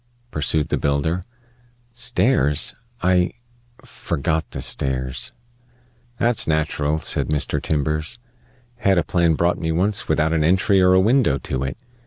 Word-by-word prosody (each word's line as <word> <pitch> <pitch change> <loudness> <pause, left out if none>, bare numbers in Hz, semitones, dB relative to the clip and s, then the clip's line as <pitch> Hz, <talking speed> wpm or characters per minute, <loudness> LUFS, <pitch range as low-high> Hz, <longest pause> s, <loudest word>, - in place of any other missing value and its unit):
pursued 75 0 0
the - - 0
builder. 75 +5 0 0.7
"Stairs? 120 - +2 0.3
I 90 -1 +2 0.5
forgot 80 +2 -2
the - - -6
stairs." 65 - -1 0.9
"That's 120 -1 +1
natural," 75 -1 0
said - - 0
Mr. 75 -2 -1
Timbers. 75 +6 -1 0.6
"Had 100 -5 +2
a 85 - +3
plan 85 -1 +2
brought 85 +2 +1
me 80 -1 -1
once 95 +5 +1
without 80 +1 +1
an 80 -2 +2
entry 95 +4 +3
or 90 0 +5
a 95 - +5
window 110 - +3
to 65 -1 -3
it. 65 - -4
80 Hz, 135 wpm, -21 LUFS, 75-95 Hz, 0.9 s, or